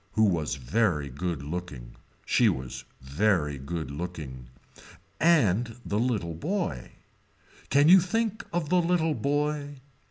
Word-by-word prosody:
Who 110 - +3
was 85 -8 +1
very 75 - 0
good 80 +2 -4
looking. 75 -6 -6 0.3
She - - +4
was 65 -1 -5 0.2
very 75 0 0
good 80 0 -5
looking. 70 -6 -6 0.7
And 120 - +3
the 105 - -1
little 110 -9 -1
boy. 85 - -3 0.8
Can 145 +2 +4
you 190 +3 +9
think 220 +4 -1
of 170 -3 -2
the 180 0 +4
little 165 -2 +1
boy. 145 0 -1
100 Hz, 125 wpm, -27 LUFS, -, 0.8 s, you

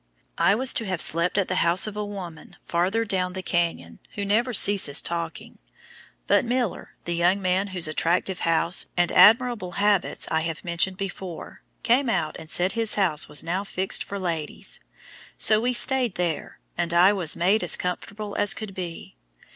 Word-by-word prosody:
I 180 +4 +3
was 260 +3 +2
to 225 - -2
have 185 -3 -3
slept 170 +5 +3
at 200 - +1
the 185 - -2
house 170 +2 +3
of 215 -1 -5
a 210 - -3
woman 185 -6 -9
farther 190 +7 -1
down 185 -3 -2
the 185 0 -6
canyon, 165 - -3 0.2
who 205 - -4
never 230 +5 0
ceases 195 -9 +4
talking, 170 -1 -4 0.7
but - - +2
Miller, 245 -3 -3
the 175 - -3
young 175 +3 +1
man 185 +1 0
whose 185 -4 0
attractive 175 +4 -1
house 165 +2 0
and 175 0 +1
admirable 225 -5 +4
habits 205 -1 0
I 160 - +1
have 165 -1 -5
mentioned 175 +2 +1
before, 190 -3 -8 0.2
came 245 +2 +2
out 155 -9 -2
and 160 - -12
said 180 +3 +3
his 225 -1 +2
house 180 -7 0
was 150 - +1
"now 180 +4 -3
fixed 190 -1 0
for 200 - -7
ladies," 165 -5 -2 0.6
so 215 0 +4
we 245 +2 0
stayed 250 -2 +4
there, 175 -3 -4 0.2
and 170 0 -2
I 185 +4 +5
was 175 -6 0
"made 190 +4 +1
as 175 - +4
comfortable" 205 +3 -6
as 205 -1 +1
could 215 -3 -8
be. 175 - -8
185 Hz, 180 wpm, -24 LUFS, 170-205 Hz, 0.7 s, I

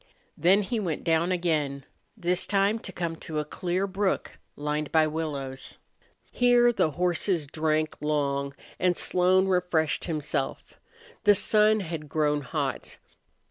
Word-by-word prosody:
Then 190 +6 +4
he 230 +4 -2
went 170 -7 -3
down 165 +2 +2
again, 150 -6 -1 0.3
this 180 -2 0
time 200 +2 +2
to 195 - -7
come 170 -2 -3
to 160 -2 -6
a 150 - -1
clear 180 +5 -2
brook 195 0 -2 0.2
lined 150 0 -3
by 160 -1 +4
willows. 145 -4 -4 0.5
Here 245 -1 +4
the 160 - +2
horses 175 -1 +1
drank 155 +1 -1
long 140 -2 -1 0.2
and 180 -1 +2
Slone 185 +1 +3
refreshed 180 -4 +1
himself. 150 -4 -3 0.5
The 205 0 +7
sun 215 +2 +3
had 160 -4 -6
grown 150 -1 +1
hot. 125 - -4
165 Hz, 135 wpm, -27 LUFS, 150-190 Hz, 0.5 s, The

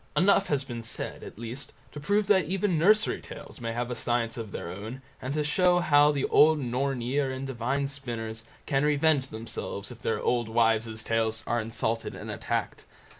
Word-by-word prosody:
Enough 195 +1 +4
has 140 -2 0
been 120 -3 -6
said, 115 0 -5
at - - -10
least, 120 +4 -7 0.2
to 150 - -7
prove 205 +7 +1
that 190 -4 +4
even 185 -1 0
nursery 215 +6 +3
tales - - -10
may 115 -1 -2
have 120 +1 -3
a - - -2
science 120 0 0
of 115 -4 -6
their 85 - -5
own, 110 +8 -7 0.2
and 130 +3 -3
to 150 - +1
show 180 +4 +3
how 150 -4 +5
the 140 -2 0
old 155 +1 +5
Nornir 135 +1 -1
and 130 +1 -4
divine 135 +2 -1
spinners 115 -5 -5 0.2
can 135 -1 +1
revenge 150 -2 +3
themselves 110 -3 -5
if 120 - -11
their 110 - -1
old 120 -2 0
wives' 115 -1 +1
tales 110 -1 0
are 120 0 0
insulted 115 0 -2
and - - -6
attacked. - - -3
130 Hz, 185 wpm, -28 LUFS, 115-150 Hz, 0.2 s, how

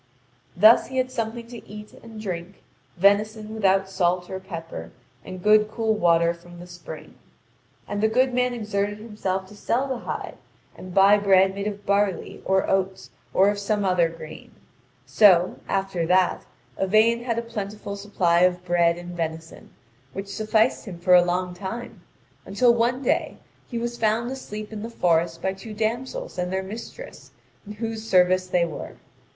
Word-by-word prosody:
Thus 215 +5 +7
he 260 - -6
had 255 0 0
something 230 -1 -4
to 240 -2 -10
eat 210 +1 -10
and 225 -2 -11
drink: 185 -2 -6 0.3
venison 210 +3 +2
without 195 -3 +2
salt 180 -1 0
or 190 - -4
pepper, 165 - -8 0.3
and 185 -1 -9
good 215 0 +5
cool 220 0 0
water 170 -4 +3
from 175 0 -14
the 175 - -9
spring. 165 -3 -11 0.7
And 205 - -3
the 220 - +4
good 255 +3 +2
man 250 0 +1
exerted 205 -2 -2
himself 195 -4 -4
to 210 - -13
sell 245 +6 -1
the 260 -3 -3
hide - - -6 0.4
and 185 - -10
buy 195 +3 +6
bread 190 -1 +4
made 200 +1 -4
of 205 -1 -6
barley, 200 -2 0
or 190 0 +2
oats, 190 0 -1 0.2
or 195 +2 +4
of 205 - -4
some 205 0 -1
other 180 -3 +3
grain; 165 -1 -11 0.5
so, 185 -4 +5
after 190 -4 -1
that, 180 +1 +2 0.3
Yvain 220 +5 +3
had 230 -2 -1
a 235 - -1
plentiful 210 -3 -6
supply 195 -4 +1
of 180 0 +2
bread 170 -1 +2
and 175 0 -8
venison, 160 -1 -5 0.4
which 195 +1 -6
sufficed 220 +2 +1
him 190 -5 -8
for 180 +1 +2
a 180 - +9
long 180 +1 -1
time, 205 +7 -7 0.4
until 235 +5 +3
one 240 +3 0
day - - 0 0.3
he 240 - -5
was 235 0 -4
found 225 +3 +1
asleep 215 -5 -7
in 210 - -6
the 225 - -5
forest 165 -5 0
by 190 - 0
two 210 +3 -10
damsels 225 -2 -3
and 180 0 -2
their 190 0 -1
mistress, 230 - -9 0.4
in 210 - -7
whose 225 0 -5
service 185 0 +4
they 180 -1 +2
were. 165 - -7
200 Hz, 170 wpm, -24 LUFS, 180-220 Hz, 0.7 s, a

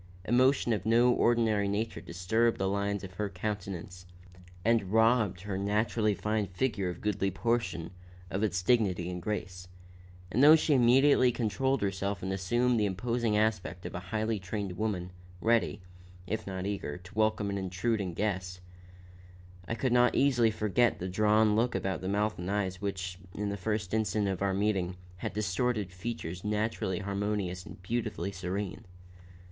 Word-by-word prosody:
Emotion 125 +1 +3
of 100 -4 -2
no 120 +3 +4
ordinary 115 -4 +2
nature 105 +3 -2
disturbed 110 +7 0
the 95 - 0
lines 100 0 -1
of 95 -1 -8
her 105 +2 -2
countenance 90 -2 -5 0.6
and 110 -5 +2
robbed 110 -4 +3
her 95 -1 -3
naturally 105 +1 +1
fine 105 0 -1
figure 95 0 -1
of 90 - -5
a - - -15
goodly 100 -2 0
portion 95 -5 -1 0.4
of 95 - -1
its 90 -5 0
dignity 90 -6 +2
and 90 0 -5
grace; 90 -2 -4 0.6
and 120 - +2
though 155 +2 +10
she 155 -1 +2
immediately 130 +1 +5
controlled 125 +2 0
herself 100 -1 -2
and 95 +1 -2
assumed 120 +6 +1
the 105 - +2
imposing 115 +3 0
aspect 105 -4 -1
of - - -5
a 90 - -3
highly 110 0 -1
trained 95 0 -4
woman, 90 -3 -2 0.3
ready, 115 +4 +2 0.5
if 110 +4 -3
not 95 -1 -4
eager, 100 -6 -3
to 90 +2 -14
welcome 110 -1 +1
an 100 - -2
intruding 95 0 -1
guest, 95 -3 -2 1.1
I 115 - -2
could 125 +1 0
not 125 0 +4
easily 125 -5 +4
forget 110 +2 +1
the 90 - -4
drawn 105 +2 +3
look 120 +1 +1
about 95 0 -2
mouth 105 +2 0
and 90 +1 -4
eyes 95 -2 -1
which, 95 -3 -4 0.2
in 105 0 -2
the 100 - -2
first 105 0 -2
instant 105 -1 +1
of 95 -1 -2
our 100 -1 +1
meeting, 95 -3 0 0.2
had - - -4
distorted 105 0 -1
features 95 -3 -5
naturally 105 -2 -1
harmonious 100 -2 -2
and - - -10
beautifully 105 -3 -2
serene. 95 +1 -4
105 Hz, 160 wpm, -30 LUFS, 95-110 Hz, 1.1 s, though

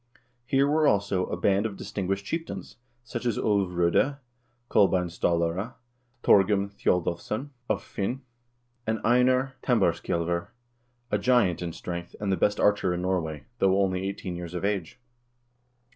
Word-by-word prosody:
Here 135 +2 +3
were, 155 +1 +3
also, 100 -2 +1
a - - -3
band 100 +4 +2
of 100 -3 -9
distinguished 95 0 -3
chieftains, 165 +7 -5 0.3
such 120 0 -5
as 120 -3 0
Ulv 100 -3 +1
K0de, 90 +11 +2 0.5
Kolbein 95 -5 +3
Stallare, 85 +6 0 0.5
Thorgrim 100 0 +4
Thjodolvsson 95 - -1 0.2
of - - 0
Hvin, 120 +6 -3 0.7
and 110 0 0
Einar 130 +2 +3
Tambarskjselver, 85 -6 +1 0.6
I - - +3
giant 110 -10 +2
in 85 -1 -3
strength, 85 +1 -6
and 100 -2 -1
the - - +3
best 105 +4 +1
archer 100 -3 +3
in 90 - -3
Norway, 80 -5 -1 0.2
though 95 0 +3
only 95 -2 +1
eighteen 95 -2 -5
years 85 0 -6
of 90 - -2
age. 100 +2 -2
95 Hz, 140 wpm, -27 LUFS, 90-110 Hz, 0.7 s, Thorgrim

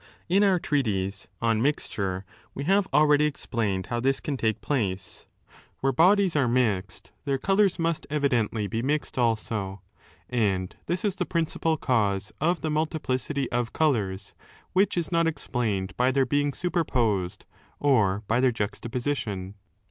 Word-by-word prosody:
In 190 +4 +3
our 195 -2 +4
treatise 105 - -1 0.2
On 115 -1 +2
Miature 100 -9 -1 0.3
we 140 - -4
have 195 +4 +3
already 150 0 +5
explained 110 -9 -2
how 120 - -2
this 135 +2 +1
can 145 - -3
take 110 -5 0
place. 100 -9 -2 0.5
Where 135 - +2
bodies 185 +4 +4
are 140 -4 +3
21 120 -3 +3
mixed 95 +1 -10
their 140 -1 +1
colours 195 +4 +2
must 165 -1 -1
evidently 120 -8 +1
be 110 +4 -2
mixed 145 0 -1
also, 110 -4 -1 0.4
and 100 -7 0
this 175 +4 -1
is 195 -2 0
the - - -2
principal 165 -1 0
cause 105 -7 0
of 170 +2 +1
the 155 - -1
multiplicity 150 -3 -1
of 120 -1 -1
colours, 105 -10 0 0.4
which 190 0 +2
is 170 -1 -1
not 165 -1 +3
explained 115 -11 -2
by 125 +1 +3
their 135 0 +2
being 145 +2 +1
super 175 +3 -1
posed 105 - -1 0.3
or 110 -8 +2
by 115 +3 +2
their 130 0 +4
juxtaposition. 115 -2 -3
130 Hz, 150 wpm, -26 LUFS, 105-155 Hz, 0.5 s, already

